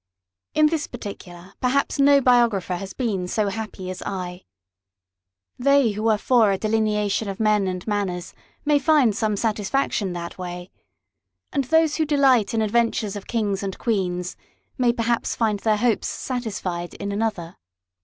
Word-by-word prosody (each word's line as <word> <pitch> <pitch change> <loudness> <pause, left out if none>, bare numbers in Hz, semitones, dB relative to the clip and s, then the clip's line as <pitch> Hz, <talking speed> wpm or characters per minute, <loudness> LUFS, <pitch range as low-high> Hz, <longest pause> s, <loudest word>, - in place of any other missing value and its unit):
In 310 - +5
this 305 -1 0
particular, 190 -5 -9
perhaps 275 +3 +1
no 280 0 +6
biographer 235 -8 +3
has 195 +1 -7
been 205 -8 -2
so 210 +2 0
happy 215 -3 -6
as 185 - -7
I. 180 -2 -5 1.1
They 275 -2 +4
who 215 +2 -2
are 215 - +3
for 225 -2 +3
a 195 - +1
delineation 210 -1 0
of 195 - -6
men 210 -3 +2
and 180 -1 -4
manners 195 -4 -2 0.3
may 295 -1 +4
find 280 -7 +3
some 215 -2 0
satisfaction 210 -2 -1
that 170 +1 -6
way, 180 0 -6 0.8
and 275 -2 0
those 320 +2 +3
who 315 - +2
delight 270 -7 +3
in 220 - +2
adventures 220 -2 0
of 205 - -8
kings 205 -4 -1
and 195 -1 -4
queens, 180 -5 -1 0.4
may 250 -2 +3
perhaps 235 0 -1
find 215 -3 0
their 215 0 +2
hopes 230 0 +1
satisfied 195 -9 -4
in 200 0 -4
another. 200 -5 -3
215 Hz, 155 wpm, -23 LUFS, 195-245 Hz, 1.1 s, no